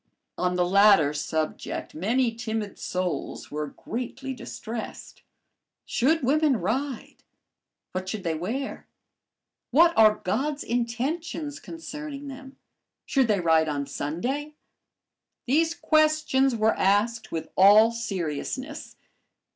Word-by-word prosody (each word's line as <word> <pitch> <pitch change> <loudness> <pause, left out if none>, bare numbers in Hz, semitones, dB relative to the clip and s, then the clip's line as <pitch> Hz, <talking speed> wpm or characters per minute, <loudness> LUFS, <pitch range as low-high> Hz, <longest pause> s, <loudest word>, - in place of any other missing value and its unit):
On 180 0 0
the 180 0 +2
latter 195 -6 +5
subject 155 +1 -3
many 230 +8 +1
timid 220 -3 -4
souls 180 -1 -3
were 150 0 -3
greatly 255 - -5
distressed. 230 -2 -7 0.6
Should 300 +5 +1
women 290 0 +3
ride? 255 +7 -3 0.7
What 185 0 -4
should 205 -2 -4
they 165 -3 0
wear? 225 - -4 0.8
What 335 +6 +5
are 215 -1 +6
"God's 280 +10 -2
intentions" 280 +6 -2
concerning 300 -3 -7
them? 270 0 -10 0.5
Should 265 -3 +2
they 205 -4 +2
ride 160 -2 +3
on 145 -1 -2
Sunday? 245 - -3 0.9
These 320 +6 +2
questions 310 -4 +2
were 220 0 +3
asked 215 +3 +1
with 160 - -4
all 210 +4 +7
seriousness. 230 - -4
230 Hz, 105 wpm, -26 LUFS, 185-275 Hz, 0.9 s, all